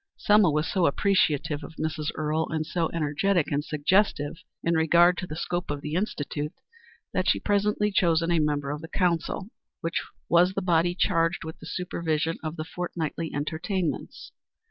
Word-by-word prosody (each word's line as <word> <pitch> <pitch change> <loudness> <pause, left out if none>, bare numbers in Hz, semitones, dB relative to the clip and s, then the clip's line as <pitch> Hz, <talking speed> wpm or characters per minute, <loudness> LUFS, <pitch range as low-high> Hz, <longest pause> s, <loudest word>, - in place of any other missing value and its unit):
Selma 210 -3 +5
was 150 +1 0
so 185 -4 +2
appreciative 150 -3 +1
of 160 - -10
Mrs. 155 -1 -2
Earle, 155 +1 -1
and 155 -1 -1
so 165 0 -1
energetic 165 +2 +1
and 145 0 0
suggestive 155 0 +1 0.2
in 170 - +2
regard 170 +2 +5
to 180 - -4
the 155 - -6
scope 175 +2 -3
of 145 -1 -3
the 150 +1 -5
Institute, 150 -5 -2 0.6
that - - +1
she - - +4
was - - -10
presently 210 0 +1
chosen 170 -3 +2
a 170 - +3
member 145 -2 0
of 150 +1 -4
the 160 - -7
council, 180 +3 -1 0.3
which 165 +1 -1 0.3
was 180 +2 +4
the 195 - 0
body 175 0 +2
charged 170 -2 +1
with 160 0 -8
the 160 - -10
supervision 165 -3 -1
of 155 0 -3
the 155 - -5
fortnightly 165 -1 -4
entertainments. 160 +4 -3
165 Hz, 170 wpm, -27 LUFS, 155-180 Hz, 0.6 s, Selma